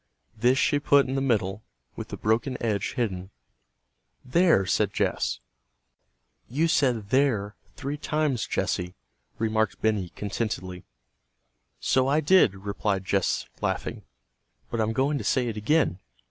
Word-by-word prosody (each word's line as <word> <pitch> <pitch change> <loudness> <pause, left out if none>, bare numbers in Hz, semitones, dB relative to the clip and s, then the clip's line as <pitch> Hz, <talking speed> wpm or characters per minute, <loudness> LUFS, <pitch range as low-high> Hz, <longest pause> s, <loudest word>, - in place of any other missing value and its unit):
This 125 +4 +3
she 145 0 +2
put 140 -2 +4
in 130 - -3
the 135 - 0
middle, 105 -6 0 0.3
with - - -6
the - - -7
broken 115 +4 0
edge 105 -4 -1
hidden. 95 -7 -2 1.0
"There!" 160 - +4
said - - +1
Jess. - - 0 1.1
"You 150 +7 +1
said 125 -10 +1
'there' 120 -7 +2 0.2
three 145 +1 -4
times, 150 -6 -1
Jessy," 90 0 -2 0.4
remarked 110 -2 0
Benny, 105 -5 0
contentedly. 95 -4 -4 0.9
"So 130 0 +2
I 145 +3 +3
did," 155 - +4
replied 100 0 -2
Jess 95 0 0 0.2
laughing, - - -2 0.7
"but 115 - 0
I'm 110 +1 0
going 140 +4 +1
to - - -5
say 125 -2 +1
it 110 - -4
again." 110 - +1
115 Hz, 130 wpm, -26 LUFS, 100-140 Hz, 1.1 s, put